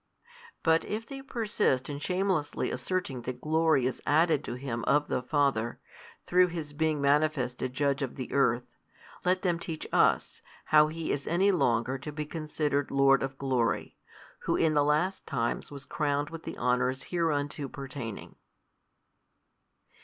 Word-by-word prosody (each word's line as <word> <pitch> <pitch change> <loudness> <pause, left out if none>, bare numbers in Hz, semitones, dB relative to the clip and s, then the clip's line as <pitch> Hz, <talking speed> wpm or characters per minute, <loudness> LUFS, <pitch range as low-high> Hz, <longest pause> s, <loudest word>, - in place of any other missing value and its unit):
But 160 0 +4
if 220 +2 -4
they 270 +2 -8
persist 215 - 0
in 145 -1 -5
shamelessly 180 -2 0
asserting 180 -9 -2
that 125 +1 -5
glory 155 -2 +2
is 130 - -2
added 155 -1 +3
to 120 - -4
Him 125 -3 -4
of 145 +1 +2
the - - 0
Father, 130 -4 0 0.5
through 180 +1 +4
His 160 -4 -6
being 155 0 0
manifested 140 -3 +1
Judge 140 0 +1
of 135 -3 -3
the 130 - -6
earth, 125 -3 +1 0.5
let 185 +1 +1
them 175 -3 +1
teach 160 -2 -5
us, - - +2 0.2
how 150 0 +6
He 160 +1 -3
is 140 - -3
any 190 +4 +3
longer 125 -6 +1
to 150 - -6
be 150 0 -4
considered 150 -2 -2
Lord 135 0 +4
of 135 0 -3
glory, 120 -6 0 0.4
Who - - 0
in 160 -2 +2
the 145 -1 +4
last 155 +6 0
times 120 -5 -2
was 140 -2 -9
crowned 145 +1 -1
with 165 -1 -8
the - - -6
honours 125 +1 +1
hereunto 150 -4 -1
pertaining. 130 -5 -7
145 Hz, 155 wpm, -29 LUFS, 130-160 Hz, 0.5 s, how